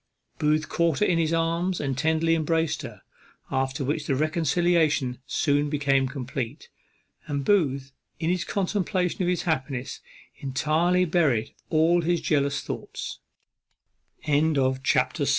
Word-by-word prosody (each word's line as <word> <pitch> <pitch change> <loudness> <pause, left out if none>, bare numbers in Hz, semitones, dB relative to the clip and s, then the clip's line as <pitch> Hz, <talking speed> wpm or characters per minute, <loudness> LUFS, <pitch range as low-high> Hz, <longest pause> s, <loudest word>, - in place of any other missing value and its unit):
Booth 155 0 +1
caught 170 -3 +1
her 210 - +2
in 170 -4 +2
his 160 -1 +1
arms 170 +2 0
and 135 -2 -2
tenderly 160 +3 +2
embraced 160 -1 0
her. 115 -8 -9 0.5
After 135 +2 -1
which 145 +2 -2
the 135 - +1
reconciliation 155 -3 +1
soon 145 -1 +1
became 140 -2 +2
complete; 130 0 -5 0.6
and 140 -1 -2
Booth, 140 -9 +1 0.3
in 165 +1 0
the 180 - 0
contemplation 185 -1 -1
of 180 - +1
his 180 - 0
happiness, 135 -5 -2 0.4
entirely 155 +7 +1
buried 155 -10 +1 0.2
all 165 +2 +3
hi 175 +1 +1
155 Hz, 115 wpm, -26 LUFS, 140-170 Hz, 0.6 s, all